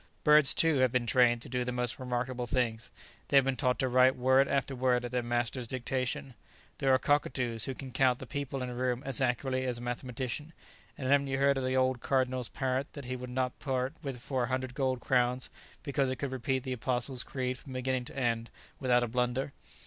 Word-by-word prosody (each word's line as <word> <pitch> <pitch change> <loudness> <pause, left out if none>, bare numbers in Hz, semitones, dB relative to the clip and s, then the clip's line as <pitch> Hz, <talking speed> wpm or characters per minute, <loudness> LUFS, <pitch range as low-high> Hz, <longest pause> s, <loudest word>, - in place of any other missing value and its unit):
Birds, 150 -2 +6
too, 160 -4 +3
have 130 -2 +3
been 125 -1 +1
trained 120 0 +3
to - - -10
do 125 0 -1
the 125 - -3
most 125 +1 -1
remarkable 125 -1 -2
things; 115 -1 -1 0.4
they 140 - +4
have 135 - +6
been 135 -1 0
taught 125 -1 +1
to 130 - +1
write 130 +1 +5
word 130 +2 +4
after 140 0 -1
word 125 -1 +1
at 120 - -5
their 125 -1 0
master's 120 +1 -2
dictation; 130 +1 -2 0.5
there 135 - +2
are 130 - +6
cockatoos 125 -5 +1
who 135 - -4
can 130 -1 -8
count 125 -1 +3
the - - -8
people 140 -2 -4
in 125 - -4
a - - -5
room 125 +1 -1
as 135 -2 +1
accurately 130 +1 0
as 125 -2 -1
a - - -8
mathematician; 125 +4 -4 0.4
and 130 - -4
haven't 140 +1 +3
you 135 0 -1
heard 140 +1 +3
of - - -3
the 130 0 0
old 130 -1 +1
Cardinal's 130 -2 0
parrot 130 +1 -2
that 140 -3 -8
he 130 +1 -3
would 125 0 -7
not 125 0 -2
part 130 0 -1
with 135 -5 -5
for 130 0 -1
a - - -6
hundred 130 -1 -2
gold 130 -1 0
crowns 125 0 +1 0.3
because 140 -2 0
it 130 - -1
could 140 0 -4
repeat 130 0 -1
the 130 -1 -3
Apostles' 125 +1 -1
creed 125 -1 -3
from 135 - -10
beginning 130 0 -1
to - - -10
end 115 -3 0 0.3
without 125 -2 +3
a - - 0
blunder? 125 +3 -1
130 Hz, 225 wpm, -31 LUFS, 125-135 Hz, 0.5 s, Birds